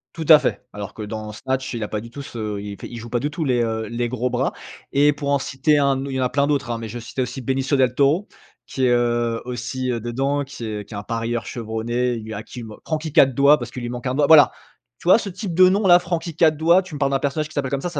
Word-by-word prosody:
Tout 160 Hz, -, -5 dB
à 155 Hz, -1 st, +10 dB
fait. -, -, -2 dB
Alors 105 Hz, -1 st, -7 dB
que 110 Hz, -, -9 dB
dans 105 Hz, 0 st, -6 dB
Snatch 130 Hz, +2 st, -3 dB
il 115 Hz, -2 st, -3 dB
a -, -, -4 dB
pas 105 Hz, -, -2 dB
du 115 Hz, +2 st, -10 dB
tout 140 Hz, +4 st, -8 dB
ce 110 Hz, -6 st, -5 dB
il 100 Hz, -1 st, -7 dB
fait -, -, -7 dB
il 120 Hz, -, -8 dB
joue 115 Hz, 0 st, -9 dB
pas 120 Hz, 0 st, 0 dB
du 145 Hz, +4 st, -2 dB
tout 160 Hz, +1 st, -4 dB
les, 125 Hz, -4 st, +1 dB
heu, 110 Hz, -1 st, -1 dB
les 120 Hz, 0 st, -2 dB
gros 125 Hz, +1 st, -2 dB
bras. -, -, -1 dB, 0.4 s
Et 145 Hz, +2 st, +5 dB
pour 145 Hz, -1 st, -4 dB
en 140 Hz, -1 st, +3 dB
citer 135 Hz, +4 st, +1 dB
un 140 Hz, -1 st, +1 dB
au -, -, -5 dB
il 135 Hz, -, -4 dB
y 130 Hz, -, 0 dB
en -, -, +2 dB
a 125 Hz, -, +1 dB
plein 140 Hz, 0 st, +1 dB
d'autres, 140 Hz, -5 st, 0 dB
hein, 115 Hz, -, -2 dB
mais 115 Hz, -1 st, -6 dB
je 120 Hz, +3 st, -6 dB
vais -, -, -9 dB
citer 130 Hz, -, -4 dB
aussi 125 Hz, +2 st, -6 dB
Benicio 135 Hz, +3 st, 0 dB
Del 130 Hz, -2 st, +2 dB
Toro, 150 Hz, +8 st, +2 dB, 0.4 s
qui 130 Hz, -1 st, -1 dB
est, 125 Hz, -, +3 dB
heu, 120 Hz, -1 st, +1 dB
aussi, 125 Hz, +1 st, -3 dB
heu, 120 Hz, -, -2 dB
dedans 135 Hz, +5 st, -1 dB
qui 130 Hz, -3 st, -9 dB
est 105 Hz, -2 st, -4 dB
qui -, -, -11 dB
est -, -, -5 dB
un 100 Hz, -, -5 dB
parieur 115 Hz, +1 st, -3 dB
chevronné 120 Hz, +2 st, -2 dB
et -, -, -2 dB
lui 110 Hz, 0 st, -8 dB
à 105 Hz, -, -6 dB
qui 125 Hz, -, -10 dB
il 115 Hz, -, -7 dB
man 110 Hz, -, -10 dB
Franky 155 Hz, 0 st, -2 dB
4 135 Hz, -3 st, +5 dB
Doigts, 140 Hz, +2 st, +6 dB
parce 120 Hz, 0 st, -6 dB
qu'il 125 Hz, -, -7 dB
lui 120 Hz, -, -4 dB
manque 125 Hz, +1 st, -5 dB
un 130 Hz, -, -1 dB
doigt. 145 Hz, -1 st, +3 dB
Voilà. 155 Hz, -2 st, +8 dB, 0.5 s
Tu 175 Hz, -, -2 dB
vois -, -, +8 dB
ce 215 Hz, -, -5 dB
type 185 Hz, -1 st, -5 dB
de 185 Hz, +2 st, +7 dB
nom 200 Hz, +2 st, +2 dB
là 175 Hz, -1 st, +7 dB
Franky 170 Hz, -2 st, -3 dB
4 160 Hz, -1 st, +3 dB
Doigts, 170 Hz, +4 st, +4 dB
tu 180 Hz, -5 st, -10 dB
me -, -, -6 dB
parles 140 Hz, -1 st, +1 dB
d'un 135 Hz, -, +1 dB
personnage 150 Hz, +2 st, -2 dB
qui -, -, -14 dB
s'appelle 135 Hz, -3 st, -2 dB
comme 135 Hz, -1 st, -1 dB
ça, 175 Hz, -, -2 dB
ça 175 Hz, -, -4 dB
130 Hz, 315 wpm, -22 LUFS, 115-145 Hz, 0.5 s, à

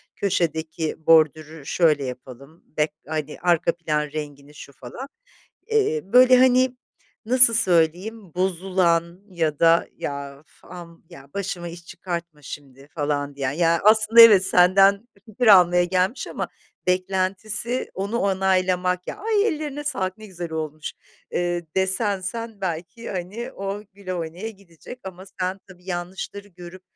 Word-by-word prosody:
köşedeki 160 Hz, -4 st, -2 dB
bordürü 155 Hz, -1 st, +3 dB
şöyle 155 Hz, -4 st, +2 dB
yapalım, 130 Hz, +4 st, -10 dB
back 150 Hz, 0 st, +1 dB, 0.2 s
hani, 155 Hz, -1 st, -4 dB
arka 170 Hz, -1 st, +2 dB
plan 155 Hz, -3 st, -1 dB
rengini 145 Hz, -1 st, -8 dB
şu 145 Hz, -, -12 dB
falan." 185 Hz, -, -9 dB, 0.6 s
Eee, 445 Hz, 0 st, +1 dB
böyle, 255 Hz, +1 st, +6 dB
hani, 255 Hz, 0 st, +3 dB, 0.5 s
nasıl 250 Hz, -1 st, +7 dB
söyleyeyim, 185 Hz, 0 st, +1 dB
bozulan 180 Hz, -1 st, 0 dB
ya 160 Hz, -5 st, -2 dB
da, 165 Hz, 0 st, +4 dB
"Ya, 140 Hz, -1 st, -6 dB
uf, 155 Hz, -, -27 dB
am 170 Hz, -2 st, -12 dB
ya, 135 Hz, +1 st, -14 dB
başıma 185 Hz, -3 st, -4 dB
iş 170 Hz, 0 st, -11 dB
çıkartma 170 Hz, -4 st, -7 dB
şimdi." 135 Hz, -1 st, -11 dB
falan 145 Hz, -2 st, -2 dB
diyen? 135 Hz, -1 st, -2 dB
Ya, 165 Hz, +1 st, +1 dB
aslında, 215 Hz, +2 st, +6 dB
evet, 210 Hz, -5 st, +8 dB
senden 195 Hz, +5 st, +4 dB, 0.2 s
fikir 230 Hz, +3 st, -3 dB
almaya 180 Hz, -3 st, +6 dB
gelmiş 185 Hz, +6 st, -1 dB
ama -, -, -5 dB, 0.4 s
beklentisi 195 Hz, +6 st, -1 dB
onu 200 Hz, +5 st, -3 dB
onaylamak. 185 Hz, -2 st, 0 dB
"Ya, -, -, -6 dB
ay, 430 Hz, -1 st, +1 dB
ellerine 295 Hz, -2 st, -4 dB
sağlık, 195 Hz, -10 st, -2 dB
ne 215 Hz, -, -11 dB
güzel 175 Hz, -4 st, -7 dB
olmuş." 155 Hz, -1 st, -5 dB, 0.4 s
ııı, 175 Hz, 0 st, -1 dB, 0.2 s
desen 190 Hz, +1 st, +1 dB
sen, 225 Hz, +3 st, -6 dB
belki, 180 Hz, +5 st, -5 dB
hani, 195 Hz, +5 st, -6 dB
o 195 Hz, +1 st, -5 dB
güle 190 Hz, -1 st, -7 dB
oynaya 175 Hz, +5 st, -5 dB
gidecek 195 Hz, +3 st, -14 dB
ama 190 Hz, 0 st, -9 dB, 0.2 s
sen, 185 Hz, +1 st, -2 dB
tabii, 180 Hz, -2 st, -17 dB
yanlışları 190 Hz, +3 st, -6 dB
görüp 180 Hz, 0 st, -12 dB
180 Hz, 135 wpm, -23 LUFS, 160-200 Hz, 0.6 s, evet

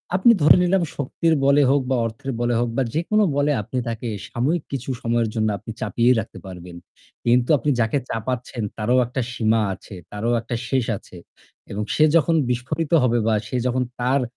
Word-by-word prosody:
আপনি 190 Hz, +6 st, +6 dB
ধরে 150 Hz, -, +7 dB
নিলাম 180 Hz, 0 st, +2 dB
শক্তির 160 Hz, +4 st, 0 dB
বলে 140 Hz, +1 st, +5 dB
হোক 140 Hz, 0 st, +3 dB
বা 130 Hz, -, +2 dB
অর্থের 115 Hz, +5 st, -5 dB
বলে 120 Hz, 0 st, +1 dB
হোক 120 Hz, -1 st, 0 dB
বা -, -, +3 dB
যেকোনো 210 Hz, +7 st, +2 dB
বলে 145 Hz, +1 st, +2 dB
আপনি 115 Hz, +5 st, -6 dB
তাকে 115 Hz, +1 st, -4 dB, 0.2 s
সাময়িক 145 Hz, +7 st, -1 dB
কিছু 135 Hz, -1 st, -4 dB
সময়ের 115 Hz, -1 st, 0 dB
জন্য 110 Hz, -1 st, +1 dB
আপনি 105 Hz, -, -8 dB
চাপিয়েই 120 Hz, +4 st, +2 dB
রাখতে -, -, -7 dB
পারবেন। 90 Hz, -2 st, -9 dB, 0.5 s
কিন্তু 120 Hz, +1 st, +3 dB
আপনি 140 Hz, +3 st, -2 dB
যাকে 115 Hz, +4 st, +1 dB
চাপাচ্ছেন, 120 Hz, 0 st, -3 dB
তারও 110 Hz, +4 st, +1 dB
একটা 125 Hz, +2 st, -3 dB
সীমা 110 Hz, -1 st, +2 dB
আছে, 95 Hz, -, -11 dB, 0.2 s
তারও 105 Hz, +3 st, -2 dB
একটা 120 Hz, +2 st, -4 dB
শেষ 130 Hz, -3 st, +1 dB
আছে 90 Hz, -, -16 dB, 0.6 s
এবং 105 Hz, +2 st, -3 dB
সে 155 Hz, -, +4 dB
যখন 165 Hz, +1 st, +3 dB
বিস্ফোরিত 125 Hz, +6 st, -2 dB
হবে 120 Hz, -1 st, +2 dB
বা 110 Hz, -, +3 dB
সে -, -, -5 dB
যখন 125 Hz, +1 st, 0 dB, 0.2 s
তার 130 Hz, +3 st, +2 dB
125 Hz, 185 wpm, -22 LUFS, 115-140 Hz, 0.6 s, ধরে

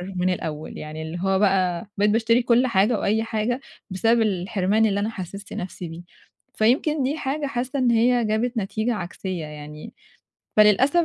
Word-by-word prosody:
من 180 Hz, 0 st, +1 dB
الأول، 155 Hz, -3 st, -6 dB
يعني 155 Hz, +1 st, -7 dB
اللي 160 Hz, +2 st, -5 dB
هو 195 Hz, 0 st, +1 dB
بقى 190 Hz, -2 st, +1 dB
بقيت 205 Hz, +1 st, +3 dB
باشتري 230 Hz, +2 st, +3 dB
كل 240 Hz, +1 st, +3 dB
حاجة 215 Hz, 0 st, +2 dB
وأي 220 Hz, +2 st, +1 dB
حاجة 225 Hz, +2 st, -1 dB, 0.3 s
بسبب 225 Hz, +5 st, +2 dB
الحِرمان 200 Hz, +1 st, +1 dB
اللي 200 Hz, -2 st, +1 dB
أنا 210 Hz, +2 st, -1 dB
حسِّست 200 Hz, -1 st, -8 dB
نَفْسي 180 Hz, -1 st, -6 dB
بيه. 165 Hz, +1 st, -8 dB, 0.5 s
فيمكن 270 Hz, +6 st, +2 dB
دي 280 Hz, +4 st, -1 dB
حاجة 290 Hz, +1 st, -2 dB
حاسّة 260 Hz, +2 st, -3 dB
إن 250 Hz, -2 st, +3 dB
هي 235 Hz, +1 st, +3 dB
جابت 225 Hz, +3 st, -1 dB
نتيجة 220 Hz, +3 st, -1 dB
عكسية 180 Hz, -2 st, -5 dB
يعني. 150 Hz, 0 st, -9 dB, 0.6 s
فللأسف 255 Hz, -, +5 dB
215 Hz, 165 wpm, -23 LUFS, 185-240 Hz, 0.6 s, فللأسف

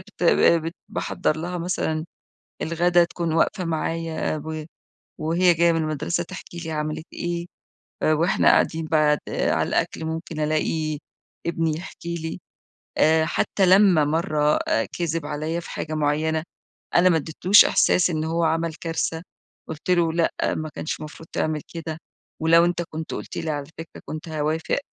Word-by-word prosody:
بت 195 Hz, -1 st, -12 dB, 0.4 s
بت 165 Hz, +2 st, -4 dB
باحضر 160 Hz, -3 st, -1 dB
لها 175 Hz, +2 st, -4 dB
مثلًا 160 Hz, -2 st, -1 dB, 0.6 s
الغدا 175 Hz, +2 st, +3 dB
تكون 170 Hz, -1 st, -2 dB
واقفة 180 Hz, +2 st, +1 dB
معايا 165 Hz, -1 st, -2 dB
و 155 Hz, -1 st, -4 dB, 0.6 s
وهي 170 Hz, +3 st, +3 dB
جاية 170 Hz, +1 st, +4 dB
من 165 Hz, -, +1 dB
المدرسة 155 Hz, +3 st, -1 dB
تحكي 175 Hz, -1 st, -9 dB
لي 165 Hz, -1 st, -5 dB
عملت 155 Hz, +1 st, -3 dB
إيه، 175 Hz, 0 st, -3 dB, 0.6 s
آآ، 155 Hz, -, +4 dB
وإحنا 170 Hz, +5 st, +2 dB
قاعدين 160 Hz, 0 st, +3 dB
بعد 155 Hz, -2 st, +3 dB
على -, -, 0 dB
الأكل 160 Hz, -, -1 dB
ممكن 160 Hz, 0 st, -5 dB
ألاقي 155 Hz, 0 st, 0 dB, 0.5 s
ابني 165 Hz, -2 st, 0 dB
يحكي 170 Hz, 0 st, -6 dB
لي. 160 Hz, +2 st, -5 dB, 0.6 s
آآ، 160 Hz, +1 st, +5 dB
حتى 190 Hz, +3 st, +1 dB
لما 185 Hz, -5 st, +6 dB
مرة 150 Hz, -1 st, +1 dB, 0.4 s
كذب 165 Hz, -3 st, -1 dB
عليّا 155 Hz, +3 st, -2 dB
في -, -, -10 dB
حاجة 155 Hz, 0 st, -4 dB
معينة، 155 Hz, +1 st, +1 dB, 0.5 s
أنا 180 Hz, +1 st, +6 dB
ما 165 Hz, -, +3 dB
اديتلوش 165 Hz, +6 st, +5 dB
إحساس 180 Hz, 0 st, +3 dB
إن 155 Hz, -1 st, -1 dB
هو 165 Hz, +1 st, 0 dB
عمل 165 Hz, 0 st, 0 dB
كارثة، 165 Hz, 0 st, -2 dB, 0.5 s
قلت 160 Hz, +3 st, -5 dB
له 170 Hz, -2 st, +3 dB
"لأ، 170 Hz, 0 st, +1 dB, 0.2 s
ما 155 Hz, 0 st, -4 dB
كانش 155 Hz, -, -5 dB
مفروض 155 Hz, +1 st, -9 dB
تعمل 155 Hz, -1 st, -1 dB
كده، 160 Hz, -1 st, -5 dB, 0.4 s
ولو 165 Hz, +1 st, +5 dB
أنت 175 Hz, 0 st, 0 dB
كنت 160 Hz, 0 st, -5 dB
قلت -, -, -7 dB
لي 160 Hz, -, -2 dB
على 145 Hz, -2 st, -3 dB
فكرة 165 Hz, 0 st, -9 dB
كنت 155 Hz, +1 st, -7 dB
هاوافق،" 155 Hz, +1 st, -1 dB
160 Hz, 150 wpm, -24 LUFS, 155-170 Hz, 0.6 s, لما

